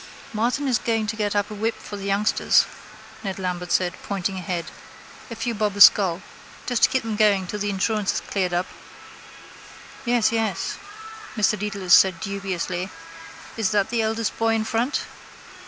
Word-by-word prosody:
—Martin 245 +6 0
is 250 -4 +2
going 225 -2 0
to 215 +1 -3
get 210 -2 -1
up 205 +1 0
a - - -4
whip 220 +2 -1
for 205 - -9
the 200 -1 -7
youngsters, 200 +2 +3 0.6
Ned 195 -2 -4
Lambert 180 -2 -4
said, 180 -1 +2
pointing 195 -1 -3
ahead. 175 -2 -3 0.6
A 230 - -6
few 235 +1 -2
bob 210 -2 -1
a - - -6
skull. 185 -3 +7 0.4
Just 245 -2 -1
to - - +6
keep 260 - 0
them 225 -1 -3
going 205 -3 +3
till 210 +3 -5
the 205 0 -1
insurance 200 +1 0
is - - -1
cleared 185 -3 -2
up. 175 +1 0 1.4
—Yes, 240 -3 +2
yes, 225 -1 -2 0.6
Mr 215 - +4
Dedalus 200 -3 -1
said 185 -3 +6
dubiously. 190 -2 -3 0.7
Is 220 -4 +1
that 205 +1 +1
the 235 -1 +1
eldest 220 0 -1
boy 225 0 +2
in 220 - 0
front? 230 +5 0
205 Hz, 170 wpm, -23 LUFS, 190-225 Hz, 1.4 s, skull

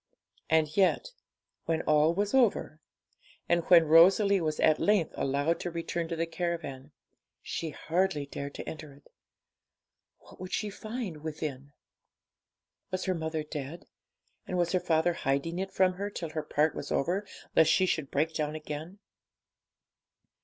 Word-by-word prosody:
And 155 -1 +2
yet, 195 - +2 0.5
when 165 -1 0
all 155 +1 +4
was 205 +1 -1
over, 225 -11 +2 0.7
and 170 0 +3
when 170 -2 +7
Rosalie 190 +5 +6
was 155 -2 -2
at 155 -1 +4
length 205 -5 +2
allowed 145 +5 0
to 175 - -3
return 170 0 -3
to 165 - -3
the 165 +1 0
caravan, 165 -5 -4 0.5
she 165 - -4
hardly 165 -1 -1
dared 140 0 -7
to - - -7
enter 155 -3 -8
it. 140 - -22 1.1
What - - -18
would 185 0 -7
she 210 -1 -1
find 215 -5 -5
within? 150 -3 -6 1.2
Was 185 0 -3
her 190 - +1
mother 160 -2 -3
dead, 150 +1 -7 0.6
and 180 - -2
was 175 -1 +1
her 185 - +2
father 165 0 +2
hiding 165 +3 -1
it 195 0 -3
from 185 -1 +3
her 200 +3 -4
till 170 -5 -6
her 155 - -2
part 150 +1 +1
was 145 - -6
over, 180 +8 0 0.3
lest 160 -1 +6
she 185 - +4
should 155 -6 -1
break 155 +3 0
down 155 -1 -2
again? 155 +4 -7
165 Hz, 155 wpm, -29 LUFS, 150-185 Hz, 1.2 s, when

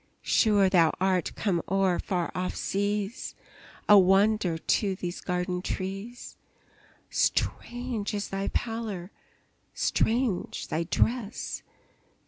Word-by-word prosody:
Sure 205 -3 +4
thou 170 -4 +4
art 185 -2 +1
come 185 -5 0
o'er 190 -2 +2
far 175 -3 -2
off 180 0 -2
seas, 205 +2 -2 0.5
A 205 -1 +9
wonder 195 -1 +3
to 195 +4 +1
these 175 -1 -5
garden 180 0 -2
trees! 195 +6 -5 0.7
Strange 240 -3 -1
is 205 - -3
thy 195 0 -2
pallor! 220 -5 -3 0.6
strange 230 -4 0
thy 165 +2 -1
dress! 230 +5 -1
195 Hz, 105 wpm, -28 LUFS, 180-215 Hz, 0.7 s, A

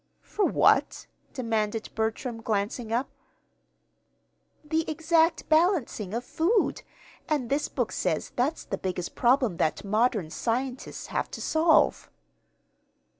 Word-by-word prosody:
"For 420 - 0
what?" - - +3 0.3
demanded 225 -3 -2
Bertram, 225 +2 -2
glancing 220 +2 -2
up. 245 +4 -1 1.5
"The 315 +2 0
exact 325 +1 +2
balancing 310 - +1
of 240 - -2
food; 370 - +1 0.5
and 280 -6 -1
this 285 +2 0
book - - -2
says - - -1
that's 270 +6 0
the 195 - -4
biggest 180 -2 -3
problem 245 -6 +2
that 155 - 0
modern 215 -4 +1
scientists 250 +5 -3
have - - -1
to - - -7
solve." 320 +1 +3
245 Hz, 115 wpm, -27 LUFS, 220-315 Hz, 1.5 s, what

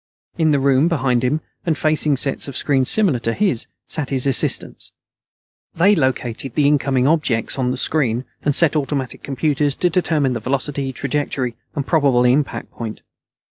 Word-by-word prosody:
In 160 -3 +1
the 145 - +3
room, 135 +2 +3
behind 130 -7 0
him, 150 +5 0 0.2
and 160 -3 -1
facing 155 -2 +2
sets 135 +1 +1
of 140 - -5
screens 135 -3 +1
similar 190 - +4
to 115 0 -1
his, 190 - 0 0.2
sat 150 -4 -3
his 135 -1 0
assistants. 135 -3 0 0.8
They 190 +5 +4
located 130 - -2
the 150 - +2
incoming 135 -3 +1
objects 140 -6 0
on 125 -1 0
the 130 - -2
screen 130 -4 0 0.2
and 145 -1 0
set 165 -3 +4
automatic 135 -3 -2
computers 145 +1 0
to 180 - 0
determining 145 -9 0
velocity, 135 +2 -2
trajectory, 135 -3 -3 0.2
and 140 -3 -2
probable 140 -7 +2
impact 135 +4 0
point. 110 -2 -7
140 Hz, 160 wpm, -19 LUFS, 130-150 Hz, 0.8 s, similar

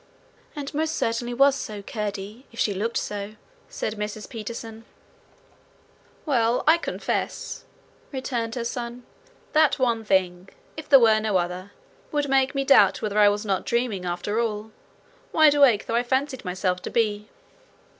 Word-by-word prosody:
'And 285 -2 -6
most 315 +2 -1
certainly 230 +1 -1
was 275 +3 +4
so, 210 -6 -6
Curdie, 210 +3 -5
if 230 - -12
she 205 - +1
looked 220 +5 -2
so,' 205 +1 -4 0.3
said 215 0 -4
Mrs 210 0 -5
Peterson. 225 0 -7 1.4
'Well, 240 -5 +2
I 325 +2 +5
confess,' - - -3 0.5
returned 245 -4 -3
her 240 - -2
son, 240 +1 -5 0.5
'that 310 -2 +4
one 235 -4 +1
thing, 185 -2 0 0.3
if 310 -1 -9
there 280 - +9
were 220 -2 +5
no 215 -3 +1
other, 180 +2 -3 0.4
would 290 -1 -1
make 270 +1 +2
me 275 - +1
doubt 275 - +5
whether 210 0 0
I 205 -1 +7
was 205 +1 -2
not 195 -3 0
dreaming, 235 -6 -1
after 180 +5 -2
all, 220 -1 -2 0.6
wide 310 -2 +6
awake 270 -8 +4
though - - -4
I 235 - +3
fancied 260 +2 -1
myself 180 -1 -1
to - - -5
be.' 210 -2 0
230 Hz, 155 wpm, -25 LUFS, 205-260 Hz, 1.4 s, there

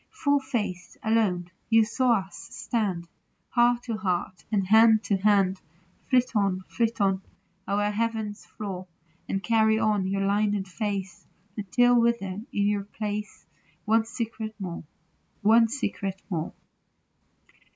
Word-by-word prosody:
Full 285 -10 +1
faced, 220 -10 -4
alone, 200 -6 +1 0.2
you 225 -1 +5
saw 235 -2 +2
us 190 -2 -13
stand, 195 -8 -3 0.4
Heart 240 0 +3
to 230 -3 -3
heart, 185 -2 -2
and 200 -3 +1
hand 220 +2 +6
to 200 - +1
hand. 195 -2 +2 0.5
Flit 250 -2 +2
on, 195 -3 +1
flit 230 -1 -1
on, 195 -1 +2 0.5
o'er 205 +1 +1
heaven's 220 -1 -2
floor, 190 -3 -7 0.4
And 195 0 -1
carry 220 -1 +3
on 210 -3 +1
your 195 +1 0
lined 205 -1 +1
face 195 -2 -4 0.3
Until 245 +4 +3
you - - +5
wither 235 -4 +1 0.2
in 200 - +1
your 205 -1 0
place 210 0 -5 0.4
One 220 +1 +3
secret 225 -1 -5
more, 175 -4 -5 0.6
one 225 +2 +6
secret 205 -6 -3
more. 165 -3 -2
210 Hz, 130 wpm, -26 LUFS, 195-225 Hz, 0.6 s, hand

